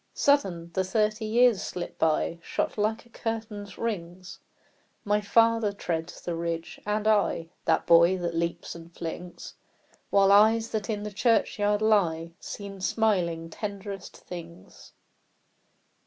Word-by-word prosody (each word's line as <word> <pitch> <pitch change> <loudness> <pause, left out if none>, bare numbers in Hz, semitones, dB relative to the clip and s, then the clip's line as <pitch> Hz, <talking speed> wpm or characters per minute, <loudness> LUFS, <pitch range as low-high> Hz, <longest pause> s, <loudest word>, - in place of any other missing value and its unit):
Sudden, 185 -13 +1
the 190 - +1
thirty 215 +3 0
years 235 -1 +4
slip 180 -1 -6
by, 160 +1 +1
Shot - - -2
like 215 +2 -1
a - - -21
curtain's 220 -4 -5
rings! 180 -5 -5 0.7
My 210 0 +2
father 230 0 +3
treads 170 -4 -4
the 175 - -3
ridge, 165 0 -4
and 210 +1 0
I 205 -6 +2 0.2
The - - +2
boy 170 +2 +6
that 175 -1 -3
leaps 170 0 -2
and 170 0 -12
flings, 175 +1 -7 0.6
While 195 -1 +5
eyes 220 +3 +5
that 215 0 -3
in 210 -2 -2
the 210 -1 -6
churchyard 210 -2 +2
lie 170 -7 +2
Seem 200 -2 -8
smiling 175 -6 0
tenderest 200 -1 -6
things. 170 -1 -11
200 Hz, 130 wpm, -27 LUFS, 170-215 Hz, 0.7 s, boy